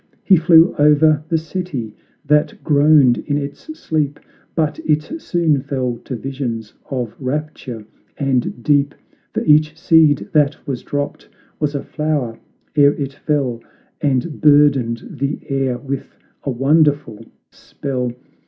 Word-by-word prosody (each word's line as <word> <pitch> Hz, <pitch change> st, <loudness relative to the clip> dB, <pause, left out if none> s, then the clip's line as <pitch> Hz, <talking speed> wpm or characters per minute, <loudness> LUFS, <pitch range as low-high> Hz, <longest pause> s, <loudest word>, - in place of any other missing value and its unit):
He 195 Hz, -, +6 dB
flew 165 Hz, 0 st, +5 dB
o'er 150 Hz, 0 st, +4 dB
the 165 Hz, -, +2 dB
city, 155 Hz, -, -5 dB, 0.3 s
that 150 Hz, +1 st, +1 dB
groaned 145 Hz, -4 st, +4 dB
in 145 Hz, -1 st, -2 dB
its 145 Hz, 0 st, -5 dB, 0.2 s
sleep, 150 Hz, -2 st, -2 dB, 0.4 s
But 155 Hz, -3 st, 0 dB
it 155 Hz, -, -1 dB
soon 160 Hz, -5 st, +1 dB
fell 130 Hz, -3 st, -2 dB
to 130 Hz, -, -4 dB
visions 120 Hz, -4 st, -5 dB, 0.2 s
of 125 Hz, -5 st, -3 dB
rapture 130 Hz, -5 st, -4 dB, 0.3 s
and 130 Hz, -3 st, -1 dB
deep; 145 Hz, -1 st, +2 dB, 0.4 s
For -, -, -2 dB
each 155 Hz, 0 st, +4 dB
seed 160 Hz, -3 st, +4 dB
that 150 Hz, -1 st, +2 dB
was 135 Hz, -5 st, -4 dB
dropped, 145 Hz, 0 st, -4 dB, 0.3 s
was 150 Hz, -1 st, -1 dB
a 140 Hz, -, -3 dB
flower 150 Hz, -7 st, -2 dB, 0.4 s
ere 145 Hz, -1 st, +5 dB
it 140 Hz, -1 st, -4 dB
fell 135 Hz, -5 st, -2 dB, 0.4 s
And 145 Hz, +2 st, -1 dB
burdened 140 Hz, -6 st, +3 dB
the 140 Hz, +2 st, -1 dB
air 135 Hz, -3 st, -1 dB
with 135 Hz, +1 st, -6 dB, 0.3 s
a -, -, -1 dB
wonderful 145 Hz, -2 st, +1 dB, 0.3 s
spell! 125 Hz, -3 st, -4 dB
145 Hz, 130 wpm, -19 LUFS, 130-150 Hz, 0.4 s, He